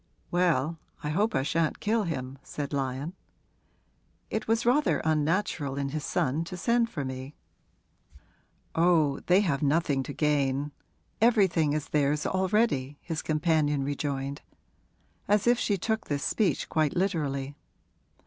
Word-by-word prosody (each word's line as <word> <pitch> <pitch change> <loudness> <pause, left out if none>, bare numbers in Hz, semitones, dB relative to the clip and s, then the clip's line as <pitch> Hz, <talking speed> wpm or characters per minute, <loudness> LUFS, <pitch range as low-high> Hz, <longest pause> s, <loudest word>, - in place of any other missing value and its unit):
'Well, 165 -3 +1 0.2
I 150 - -2
hope 205 +8 +1
I 130 - +2
shan't 165 +2 0
kill 220 0 +1
him,' 135 -5 -4
said 145 -1 -5
Lyon. 135 +4 -2 1.2
'It 220 0 -2
was 225 +1 +1
rather 270 +5 +3
unnatural 155 -2 0
in 140 -1 -1
his 150 +1 -4
son 160 -1 0
to 180 +2 -7
send 235 +4 +2
for 145 -9 -4
me.' 130 +2 -6 1.4
'Oh, 160 -4 +3
they 185 +3 +5
have 160 -8 0
nothing 145 -1 +2
to 135 - -6
gain 145 -1 0 0.5
everything 190 -10 +4
is 150 -1 -3
theirs 150 0 +1
already!' 190 - +1
his 165 -2 -4
companion 150 -2 +1
rejoined, 140 0 -3 0.9
as 205 0 +3
if 240 0 +4
she 205 - +1
took 220 +4 -1
this 145 -1 -2
speech 210 -5 +1
quite 155 -2 +1
literally. 145 -7 -1
155 Hz, 135 wpm, -28 LUFS, 140-185 Hz, 1.4 s, they